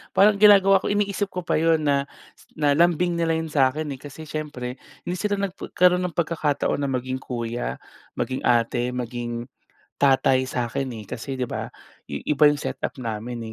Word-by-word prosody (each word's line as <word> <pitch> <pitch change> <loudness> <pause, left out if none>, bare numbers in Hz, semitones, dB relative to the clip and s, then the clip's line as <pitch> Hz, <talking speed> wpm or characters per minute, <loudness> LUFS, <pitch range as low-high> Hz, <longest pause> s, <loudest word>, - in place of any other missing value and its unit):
Parang 200 0 +5
ginagawa 195 -2 +7
ko, - - -4
iniisip 205 0 0
ko 180 -2 -6
pa 160 - +1
'yon 160 -1 +3
na 140 -1 +1 0.5
na 145 -2 +2
lambing 170 +2 +2
nila 165 -1 +1
'yon 160 -1 -3
sa 135 -3 +4
akin, 150 +4 -3
eh, 135 - -6
kasi 145 +3 -10
siyempre 145 -5 -5 0.2
hindi 180 - -3
sila 205 +1 0
nagpa 195 -2 -4
karoon 180 0 +5
ng 170 - -10
pagkakataon 155 -5 0
na 140 - -1
maging 130 0 -2
kuya, 120 -2 -4 0.4
maging 130 0 -2
ate, 120 +1 +1
maging 120 -1 -4 0.6
tatay 135 -1 +4
sa 125 -2 -2
akin, 130 +2 -3
eh, 105 - -11
kasi 135 +5 -5
'di 125 - -1
ba - - -5 0.4
i 70 - -6
iba 150 0 +3
'yong 145 -1 +5
set - - -3
up - - 0
namin, 115 0 -4
145 Hz, 185 wpm, -24 LUFS, 125-170 Hz, 0.6 s, ginagawa